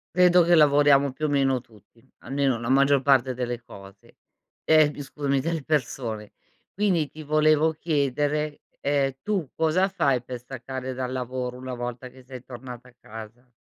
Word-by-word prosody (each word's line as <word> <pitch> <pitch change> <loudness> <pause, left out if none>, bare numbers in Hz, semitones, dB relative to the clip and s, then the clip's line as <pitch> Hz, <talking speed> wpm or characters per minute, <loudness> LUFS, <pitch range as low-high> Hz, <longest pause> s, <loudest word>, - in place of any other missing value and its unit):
Credo 180 0 +6
che 175 +1 +4
lavoriamo 145 -2 +5
più 155 +4 -4
o - - 0
meno 135 -2 +2
tutti, 115 0 -23 0.2
almeno 135 -3 -1
la 115 +1 -4
maggior 140 +1 +4
parte 130 -2 +3
delle 120 -1 -4
cose. 100 -3 -15 0.5
Ehm, 155 -2 +5
bi 145 - -8
scusami 140 0 -2
delle 165 +2 -2
persone. 115 -7 -2 0.4
Quindi 185 -6 +1
ti 155 +3 -10
volevo 155 +1 +3
chiedere, 150 -1 -1 0.2
ehm, 140 -1 +1
tu 190 -8 -2
cosa 165 +4 +2
fai 135 -10 +1
per 125 0 -7
staccare 130 +1 -6
dal 130 0 -4
lavoro 125 -1 -4
una 130 0 -6
volta 120 +1 -6
che 130 +1 -17
sei 125 -1 -10
tornata 125 0 -10
a 125 - -24
casa? 110 +3 -11
135 Hz, 165 wpm, -25 LUFS, 125-150 Hz, 0.5 s, Credo